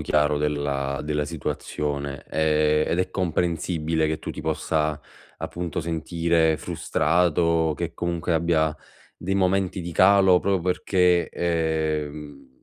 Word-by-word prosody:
chiaro 75 -1 +1
della 70 -2 -1
della 75 -1 -1
situazione 70 -3 -4
e 75 -1 +2
ed 85 - -1
è 90 0 0
comprensibile 80 -3 0
che 80 0 -2
tu - - -6
ti - - -7
possa, 75 -1 -1 0.4
appunto, 85 -1 -4
sentire 80 0 +1
frustrato, 85 -1 +1
che - - -4
comunque 85 0 -2
abbia 80 -2 +1 0.4
dei 95 +2 -2
momenti 95 0 +1
di 85 0 -6
calo 95 0 +5
proprio 100 -2 +1
perché, 90 -1 +2
ehm, 80 -3 -2
80 Hz, 120 wpm, -24 LUFS, 75-85 Hz, 0.4 s, calo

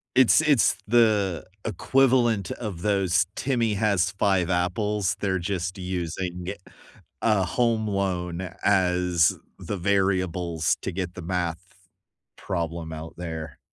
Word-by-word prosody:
It's 130 +2 +6
it's 145 -7 +3
the 105 -6 +3 0.2
equivalent 120 -2 +2
of 100 -8 -5
those 95 -2 +2
"Timmy 120 -5 0
has 100 -3 +1
5 95 -2 +1
apples," 95 +2 0
they're 95 -2 0
just 95 +1 -3
using 90 0 -4 0.7
a 105 -4 +3
home 115 +2 +1
loan 95 -4 -2 0.2
as 90 -3 +3 0.2
the 105 - -4
variables 90 -4 +1
to - - -2
get 90 -1 -4
the 90 - -8
math 85 -1 -2 0.8
problem 85 -3 -4
out 80 +1 -7
there. 80 -4 -6
95 Hz, 115 wpm, -25 LUFS, 90-105 Hz, 0.8 s, It's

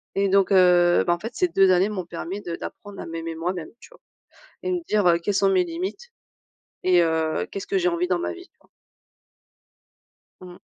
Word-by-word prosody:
Et 200 0 +2
donc, 195 0 +2
heu, 180 -2 +5
ben 175 - +4
en 175 - -4
fait 225 +6 -7
ces 365 - +1
2 195 - +4
années 185 +2 +3
m'ont 190 -4 -4
permis 175 +4 -6
de 170 -4 -5
d'apprendre 205 -1 -9
à - - -6
m'aimer 165 0 -6
moi-même, 170 0 -4
tu - - -15
vois? - - -19 0.6
Et 370 - -2
me 360 -1 -1
dire: 195 -5 +3
«Quelles 205 - 0
sont 195 0 +3
mes 185 -1 +3
limites? 185 - -6 0.7
Et 180 -1 +4
heu, 160 -1 0
qu'est-ce 195 - -6
que 195 - 0
j'ai 180 -1 +1
envie 170 +1 0
dans 180 -1 0
ma - - -3
vie?» 360 +1 -12
tu - - -48
vois? - - -28 1.7
Mmh. 180 -1 -12
185 Hz, 205 wpm, -24 LUFS, 175-200 Hz, 1.7 s, heu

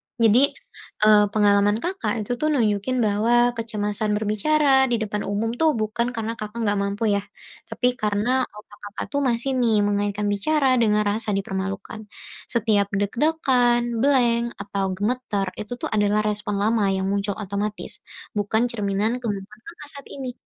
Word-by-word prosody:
Jadi, 230 0 +4 0.6
eee, 215 -1 +7
pengalaman 205 -1 +3
Kakak 360 - -2
itu 205 - -6
tuh 305 - +1
nunjukin 220 -1 0
bahwa 230 +4 +3
kecemasan 210 -2 -2
berbicara 265 +6 +2
di 240 - +1
depan 210 -1 -3
umum 210 +3 -1
tuh 320 - +4
bukan 220 +2 -1
karena 225 0 -3
Kakak 215 +2 -5
gak 205 -2 +1
mampu 200 +2 -2
ya, - - -2 0.5
tapi 250 - 0
karena 210 0 0 0.2
otak 210 0 -15
Kakak 205 0 -6
tuh 285 - 0
masih 240 +2 0
nih 230 -3 +3
mengaitkan 205 0 -1
bicara 275 +8 +1
dengan 210 -2 +3
rasa 210 0 -1
dipermalukan. 195 +2 -4 0.5
Setiap 215 -4 +1
deg-degan, 240 +1 +1
blank, 235 -3 +2
atau 200 -1 -2
gemeter 205 -1 -1
itu 210 +3 -5
tuh 245 - -5
adalah 210 0 +2
respon 210 -1 -1
lama 215 -1 +2
yang 190 - -2
muncul 200 0 -1
otomatis, 205 +1 -4 0.4
bukan 220 +4 +1
cerminan 210 +2 -1
kemampuan 210 -2 -5
Kakak 330 -3 -11
saat 280 - -14
ini. 265 -2 -6
215 Hz, 150 wpm, -23 LUFS, 205-240 Hz, 0.6 s, eee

